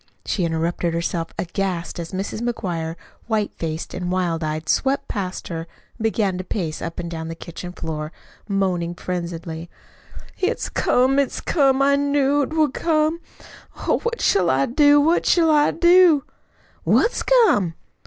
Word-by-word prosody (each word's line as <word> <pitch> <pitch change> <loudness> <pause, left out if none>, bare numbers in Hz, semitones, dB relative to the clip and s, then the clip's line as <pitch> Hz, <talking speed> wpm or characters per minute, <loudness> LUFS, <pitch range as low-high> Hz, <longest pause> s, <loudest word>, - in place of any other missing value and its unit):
she 190 - -1
interrupted 165 +1 -1
herself, 170 0 -2
aghast, 180 -1 -3
as 165 -1 -6
Mrs. 195 +3 -4
McGuire, 175 -9 -3 0.3
white 215 -3 0
faced 160 0 -4
and 180 0 -3
wild 175 -3 0
eyed, 155 +1 -3
swept 270 - +1
past 190 -3 -4
her 165 -1 -5 0.3
and 225 - -6
began 205 -4 0
to - - -3
pace 175 -4 -3
up 165 0 -5
and 170 -1 -5
down 160 -1 -5
the 165 - -5
kitchen 170 +2 -8
floor, 155 -3 -5 0.4
moaning 185 -4 -1
frenziedly: 170 -2 -5 0.7
"It's 375 - -1
come 260 +2 +2
it's 280 - 0
come 275 -3 +2
I 280 0 +4
knew't 285 0 +1
would 310 -4 +2
come. 320 0 +1 0.6
Oh, - - 0
what 470 0 -3
shall 185 -4 +3
I 135 +1 +3
do? 290 +3 +5
What 320 +4 +2
shall 330 -2 +4
I 295 -1 +4
do?" 345 -3 +5 0.6
"What's 475 - +2
come?" 360 - +3
190 Hz, 155 wpm, -22 LUFS, 170-280 Hz, 0.7 s, do